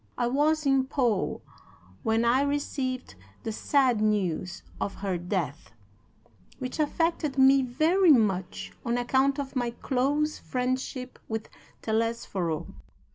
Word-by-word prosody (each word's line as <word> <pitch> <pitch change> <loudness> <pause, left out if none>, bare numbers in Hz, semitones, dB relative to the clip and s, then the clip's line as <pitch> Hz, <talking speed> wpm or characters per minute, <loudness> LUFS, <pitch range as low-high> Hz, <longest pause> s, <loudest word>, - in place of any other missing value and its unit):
I - - +1
was 300 +5 +2
in 270 -1 +3
Pau 245 -7 0 0.6
when 225 +1 +1
I 245 +3 +4
received 275 - -2 0.3
the 225 - -2
sad 250 0 +2
news 190 -4 0 0.2
of 200 - -2
her 195 -2 -2
death, 175 - -3 0.8
which 255 +3 -5
affected 310 -1 0
me 270 +1 +6
very 315 +9 +3
much 195 -8 +1
on 235 -1 0
account 265 +3 +2
of 280 -1 -5
my 245 -2 0
close 280 +5 0
friendship 255 0 -3
with 220 -1 -4 0.3
Telesforo. 220 -7 -1
255 Hz, 120 wpm, -27 LUFS, 220-275 Hz, 0.8 s, me